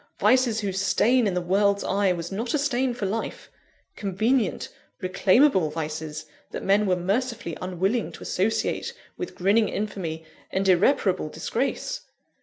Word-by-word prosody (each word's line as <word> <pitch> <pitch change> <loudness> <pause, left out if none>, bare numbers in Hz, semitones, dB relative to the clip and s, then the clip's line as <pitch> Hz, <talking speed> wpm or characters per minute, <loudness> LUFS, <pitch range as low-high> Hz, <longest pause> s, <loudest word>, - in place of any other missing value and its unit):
vices 250 -4 +3
whose 195 -1 -2
stain, 220 +5 +3
in 190 - -1
the - - +2
world's 200 +3 +2
eye, 195 -1 +2
was 170 0 -4
not 230 +7 -2
a - - +3
stain 265 -3 +1
for 240 -4 -4
life! 220 +4 -4 0.4
convenient, 215 +3 0 0.3
reclaimable 185 - +3
vices, 155 0 -5 0.2
that - - -6
men 200 +2 +3
were 185 - +3
mercifully 205 0 -2
unwilling 190 +5 -1
to - - -10
associate 205 +4 -1 0.2
with 365 - -6
grinning 205 +4 +3
infamy 170 -6 -4 0.3
and 195 0 0
irreparable 185 - +3
disgrace! 255 - -2
200 Hz, 140 wpm, -25 LUFS, 180-230 Hz, 0.4 s, vices